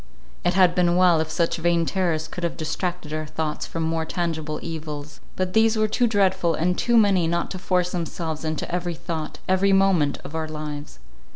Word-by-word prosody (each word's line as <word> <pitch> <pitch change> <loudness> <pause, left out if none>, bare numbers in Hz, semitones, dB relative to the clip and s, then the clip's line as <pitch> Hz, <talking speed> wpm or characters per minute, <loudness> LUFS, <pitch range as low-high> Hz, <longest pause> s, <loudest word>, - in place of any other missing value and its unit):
It 175 - +1
had 185 -2 +5
been 175 -1 +3
well, 180 -2 +5
if 160 0 -1
such 165 +2 0
vain 170 0 +2
terrors 165 -4 0
could 180 - -7
have 170 - -2
distracted 165 0 -3
our 155 0 -3
thoughts 155 0 -3
from 165 - -3
more 160 0 0
tangible 160 -2 -3
evils. 150 -2 -6 0.2
But 185 0 -2
these 220 0 +4
were 215 0 +3
too 240 +3 +2
dreadful 190 -5 +2
and 180 +3 +1
too 240 +4 +2
many 195 -6 +4
not 170 +1 -1
to 185 - -5
force 180 -1 0
themselves 165 -2 -4
into 155 +1 -3
every 175 -1 -1
thought, 160 -1 -5
every 190 +1 +3
moment, 190 -7 +3
of 140 - -9
our 160 -1 -2
lives. 150 - -6
170 Hz, 195 wpm, -24 LUFS, 160-185 Hz, 0.2 s, had